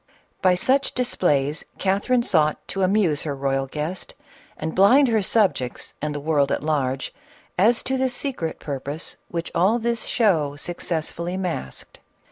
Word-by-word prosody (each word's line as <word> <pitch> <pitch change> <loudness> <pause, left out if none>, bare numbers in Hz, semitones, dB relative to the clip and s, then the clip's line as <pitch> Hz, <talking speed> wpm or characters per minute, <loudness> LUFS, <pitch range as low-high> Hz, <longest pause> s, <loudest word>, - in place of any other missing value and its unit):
By 185 -1 +4
such 265 +9 +1
displays 150 - 0
Catherine 205 +6 +1
sought 155 -7 +1
to 195 - -2
amuse 185 -6 +2
her 145 -3 -3
royal 135 0 -1
guest, 155 +6 -4 0.4
and 160 +1 -3
blind 250 +9 +6
her 220 -2 +3
subjects 190 - 0
and 150 0 -2
the - - -2
world 145 -2 +1
at - - -1
large, 135 -3 -1 0.4
as 225 +6 +3
to 265 - -1
the 260 0 +2
secret 245 - -3
purpose 145 +2 -4
which 170 -1 -4
all 190 +7 +3
this 235 0 -1
show 160 - +2
suc 175 +4 -5
cessfully 170 +2 -3
masked. 175 - -5
170 Hz, 150 wpm, -23 LUFS, 145-215 Hz, 0.4 s, blind